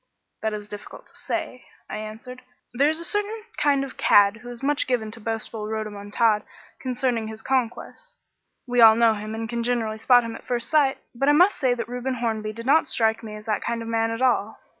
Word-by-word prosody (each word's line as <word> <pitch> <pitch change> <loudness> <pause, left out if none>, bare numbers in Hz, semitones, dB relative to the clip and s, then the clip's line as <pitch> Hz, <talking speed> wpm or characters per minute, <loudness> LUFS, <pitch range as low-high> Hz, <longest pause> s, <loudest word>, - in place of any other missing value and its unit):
"That 220 -1 -1
is 210 -1 -6
very 205 0 -6
difficult - - -13
to - - -19
say," - - -5 0.2
I - - -5
answered. 220 +4 -8 0.3
"There 280 +5 +3
is 315 +1 -1
a 335 - -4
certain 415 +3 -1
kind 280 -2 +2
of 275 - -8
cad 205 +1 +5
who 245 +2 -11
is 240 +1 -8
much 290 +1 +1
given 230 -4 -1
to 230 - -8
boastful 225 -1 -4
rhodomontade 215 0 0 0.4
concerning 250 -3 -1
his 220 0 -8
conquests. 265 - -3 0.5
We 245 -1 +2
all 220 -1 +9
know 230 -1 +4
him 215 +1 -6
and 225 0 -4
can 235 0 -3
generally 230 -2 -1
spot 245 +1 +5
him 230 -1 -5
at - - -10
first 240 -1 -1
sight, 285 -4 +3 0.2
but 275 +4 +1
I - - +6
must 360 +6 +5
say 255 -4 +2
that 230 -2 -4
Reuben 250 +2 -3
Hornby 220 -3 -2
did 230 +2 -9
not 290 +5 +4
strike 220 -1 +1
me 215 -2 -8
as 210 0 -10
that 215 -2 -1
kind 230 -1 -3
of - - -8
man 225 0 +1
at 225 +3 -3
all. 225 -4 +1
230 Hz, 225 wpm, -24 LUFS, 220-255 Hz, 0.5 s, all